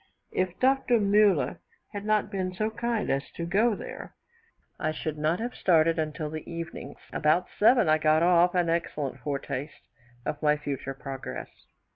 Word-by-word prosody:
If 185 -1 -1
Dr. 260 -2 +3
Muller 200 -9 +3 0.3
had 205 0 -5
not 215 -1 +1
been 185 -2 -2
so 215 +3 -1
kind 235 -1 -1
as 135 0 -1
to 170 - -3
go 210 +6 +2
there, - - -8 0.6
I 155 - 0
should 155 0 -4
not 155 +3 0
have 240 +2 -3
started 165 -2 +3
until 155 0 -3
the 155 -1 -7
evening. 165 -1 -6 0.2
About 155 +3 +2
7, 240 -1 +5
I 155 0 +4
got 155 +1 +3
off 175 +1 +4
an 175 -1 +2
excellent 150 -5 -2
foretaste 140 +1 -5 0.4
of 150 - -3
my 150 -1 +3
future 140 -2 -4
progress. 135 -1 -8
170 Hz, 160 wpm, -27 LUFS, 150-205 Hz, 0.6 s, 7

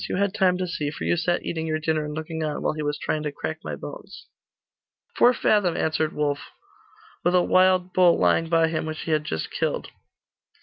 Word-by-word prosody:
You - - -1
had 200 +1 0
time 185 -4 +2
to 185 - -2
see, 155 -4 -3
for 145 - -7
you - - +2
sat 175 +1 -1
eating 160 -1 -3
your 155 0 0
dinner 155 -1 -1
and 150 0 -5
looking 160 0 -4
on, 150 -1 -3
while - - +1
he 155 - -5
was 145 0 -2
trying 155 - -2
to 150 -1 -3
crack 160 +2 -5
my - - -4
bones.' - - -10 0.9
'Four 245 - +6
fathom,' 205 -7 +2
answered 155 0 0
Wulf. 145 -1 -2 0.7
'With 175 +1 +2
a 180 - +5
wild 185 0 +3
bull 180 -2 +5
lying 165 0 +2
by 165 -1 +4
him, 160 -1 -2
which 155 -1 -5
he 165 - -4
had 155 -1 +1
just 80 - -4
killed. - - -2
160 Hz, 215 wpm, -24 LUFS, 155-180 Hz, 0.9 s, Four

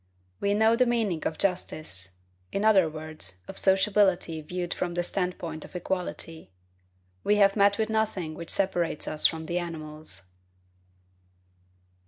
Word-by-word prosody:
We 200 0 +1
know 220 +2 +5
the 250 +1 +3
meaning 220 -8 +1
of 160 - -4
justice; 155 - -2 0.4
in 200 +2 0
other 195 -6 +6
words, 155 - -6
of - - -7
sociability 190 -4 +3
viewed 175 +2 -3
from 175 -1 -3
the 175 - +1
standpoint 175 -4 -3
of - - -12
equality. 180 -3 -3 0.7
We 210 - +4
have 200 -1 +5
met 200 -1 +4
with 220 -1 0
nothing 210 -7 0
which 170 +1 -8
separates 175 -5 0
us 155 0 +4
from 160 -1 -5
the 175 +2 -1
animals. 155 - -6
180 Hz, 140 wpm, -28 LUFS, 160-200 Hz, 0.7 s, other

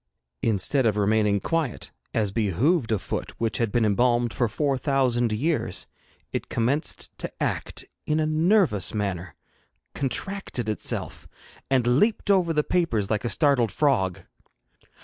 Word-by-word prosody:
Instead 115 +4 +2
of 105 -1 +1
remaining 105 0 +2
quiet, 160 0 -2 0.2
as 105 -3 0
behoved 115 - +1
a 110 - +3
foot - - -5
which 115 -1 -1
had 115 -3 0
been 120 0 +2
embalmed 120 +2 +2
for 120 - +1
four 140 +6 0
thousand 130 -4 +1
years, 145 +9 0 0.5
it - - -3
commenced 130 +7 -1
to - - -3
act - - -3 0.2
in 155 +1 +1
a 155 - +2
nervous 155 - +2
manner, 95 -5 -3 0.6
contracted 140 - -3
itself, 110 - -3 0.4
and 130 -3 +2
leaped 210 -1 +2
over 180 -4 +3
the 150 -2 +1
papers 115 - 0
like 110 -1 0
a 120 - -1
startled 135 - +3
frog. 110 - +1
120 Hz, 140 wpm, -25 LUFS, 105-150 Hz, 0.6 s, a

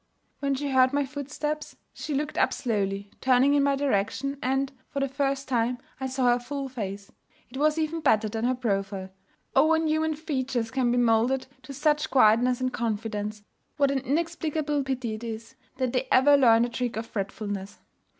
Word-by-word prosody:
When 275 -1 0
she 285 +1 -3
heard 260 0 +4
my 285 0 +1
footsteps, 295 +2 -4 0.2
she 300 - -4
looked 295 +2 -2
up - - +2
slowly, 200 -4 -2
turning 260 +2 +4
in 290 - +4
my 280 0 +3
direction, 275 +1 -1
and, 270 +1 0 0.2
for 280 - -3
the 275 - +1
first 275 0 -1
time, 245 -1 +1 0.2
I 265 - -2
saw 260 0 -1
her 240 0 +3
full 275 +2 -5
face. 200 -5 -6 0.4
It 265 - -7
was 305 +2 +2
even 320 +1 -1
better 215 -6 +3
than 225 +2 -2
her 255 +1 +2
profile. 195 -5 -2 0.4
Oh! 270 +3 +6
when 325 0 +3
human 315 0 +1
features 260 -6 -2
can 260 -2 +1
be 245 - +1
moulded 240 +2 +2 0.2
to 280 - -10
such 300 +2 +1
quietness 245 0 +4
and 255 0 -1
confidence, 210 -2 -3 0.3
what 280 -2 +3
an 275 - +1
inexplicable 305 +1 -1
pity 255 -4 -2
it 215 +2 -7
is 225 +1 -6 0.2
that 255 -2 -1
they 260 +1 0
ever 285 +3 +6
learn 235 -4 +5
the 240 - 0
trick 240 -1 -3
of 225 - -3
fretfulness! 200 -1 -5
260 Hz, 185 wpm, -27 LUFS, 225-280 Hz, 0.4 s, Oh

